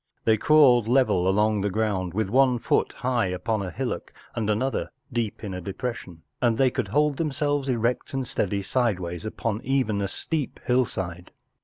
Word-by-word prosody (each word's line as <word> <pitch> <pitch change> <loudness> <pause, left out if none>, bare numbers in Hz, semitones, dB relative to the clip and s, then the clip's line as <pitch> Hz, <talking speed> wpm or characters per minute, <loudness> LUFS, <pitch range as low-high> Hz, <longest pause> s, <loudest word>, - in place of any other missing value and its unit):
They 110 - +5
crawled 125 -2 +5
level 120 -8 +3
along 105 +2 +2
the 100 - 0
ground 95 -4 -1
with 105 -2 -1
one 130 0 +4
foot - - +1
high 125 -5 0
upon 90 +4 -2
a 95 - -3
hillock 80 - -4 0.2
and 110 -2 -2
another 130 +6 0 0.2
deep 115 -3 -2
in 100 -3 -4
a 90 - -5
depression, 95 -4 -6 0.2
and 120 -3 +2
they 130 0 +3
could - - -2
hold 150 -1 +1
them¬ 160 -3 -1
selves 145 0 0
erect 120 0 0
and 135 -1 -2
steady 100 -2 -1
sideways 95 -7 -1
upon 110 0 -3
even 130 -6 0
a 100 - 0
steep 150 - -3
hillside. 95 -9 -1
110 Hz, 175 wpm, -25 LUFS, 100-130 Hz, 0.2 s, They